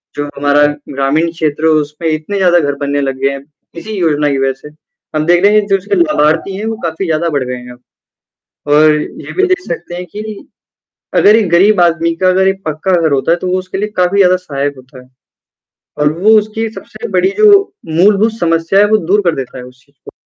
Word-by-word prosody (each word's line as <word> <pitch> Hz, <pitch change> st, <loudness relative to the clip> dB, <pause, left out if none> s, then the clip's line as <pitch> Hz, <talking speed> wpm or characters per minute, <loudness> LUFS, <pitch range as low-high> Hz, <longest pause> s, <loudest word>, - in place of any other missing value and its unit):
जो 145 Hz, -, -3 dB
हमारा 145 Hz, +1 st, +3 dB, 0.2 s
ग्रामीण 140 Hz, +5 st, 0 dB
क्षेत्र 160 Hz, -2 st, -2 dB
है 160 Hz, -, +4 dB
उसमें 155 Hz, +2 st, -1 dB
इतने 155 Hz, +6 st, -3 dB
ज़्यादा 180 Hz, -2 st, +3 dB
घर 145 Hz, -3 st, -1 dB
बनने 140 Hz, 0 st, -2 dB
लग 135 Hz, -1 st, -3 dB
गए 135 Hz, -, +2 dB
हैं। 140 Hz, 0 st, -7 dB, 0.4 s
इसी 215 Hz, +6 st, -9 dB
योजना 150 Hz, -4 st, +1 dB
की 140 Hz, -, -1 dB
वजह 135 Hz, 0 st, 0 dB
से 150 Hz, -, -11 dB, 0.5 s
हम 155 Hz, 0 st, 0 dB
देख 175 Hz, +2 st, +3 dB
रहे 205 Hz, +1 st, +5 dB
हैं 210 Hz, -, -2 dB
जो 195 Hz, -1 st, +2 dB
इसके 195 Hz, -, -3 dB
लाभार्थी 190 Hz, -, +1 dB
हैं 210 Hz, -, -5 dB
वो 225 Hz, 0 st, -2 dB
काफ़ी 165 Hz, +3 st, -3 dB
ज़्यादा 165 Hz, 0 st, -1 dB
बढ़ 140 Hz, -4 st, -1 dB
गए 125 Hz, 0 st, -4 dB
हैं 125 Hz, 0 st, -10 dB
अब 120 Hz, -, -18 dB, 0.9 s
और 155 Hz, +1 st, +5 dB
ये 150 Hz, -, -6 dB
भी 380 Hz, -, +2 dB
देख 370 Hz, +1 st, +1 dB
सकते 175 Hz, +1 st, -6 dB
हैं 180 Hz, +1 st, -6 dB
कि 215 Hz, 0 st, -8 dB, 0.7 s
अगर 210 Hz, +2 st, +5 dB
एक 220 Hz, -4 st, +1 dB
गरीब 190 Hz, +3 st, +4 dB
आदमी 170 Hz, -1 st, +2 dB
का 185 Hz, -, +4 dB
अगर 190 Hz, +1 st, +3 dB
एक 195 Hz, 0 st, -2 dB
पक्का 155 Hz, +5 st, -2 dB
घर 160 Hz, -3 st, +1 dB
होता 140 Hz, +4 st, +1 dB
है 175 Hz, -, +1 dB
तो 185 Hz, -, -5 dB
वो 185 Hz, -, 0 dB
उसके 185 Hz, +1 st, -6 dB
लिए 210 Hz, +2 st, -2 dB
काफ़ी 180 Hz, +2 st, +1 dB
ज़्यादा 185 Hz, -2 st, +4 dB
सहायक 145 Hz, -5 st, -4 dB
होता 130 Hz, +1 st, -15 dB
है। 125 Hz, -, -22 dB, 0.9 s
और 150 Hz, 0 st, +2 dB
वो 205 Hz, +4 st, +2 dB
उसकी 215 Hz, +2 st, -4 dB
सबसे 465 Hz, -, -9 dB
बड़ी 380 Hz, -, +2 dB
जो 430 Hz, 0 st, +5 dB, 0.4 s
मूलभूत 200 Hz, +7 st, +2 dB
समस्या 165 Hz, +3 st, +1 dB
है 205 Hz, -, +6 dB
वो 215 Hz, -, +5 dB
दूर 205 Hz, +1 st, +4 dB
कर 170 Hz, -2 st, +1 dB
देता 130 Hz, -1 st, -6 dB
है 125 Hz, -, -8 dB
उस 125 Hz, +1 st, -17 dB
चीज़ 140 Hz, -, -34 dB
को। -, -, -10 dB
165 Hz, 230 wpm, -13 LUFS, 145-195 Hz, 0.9 s, है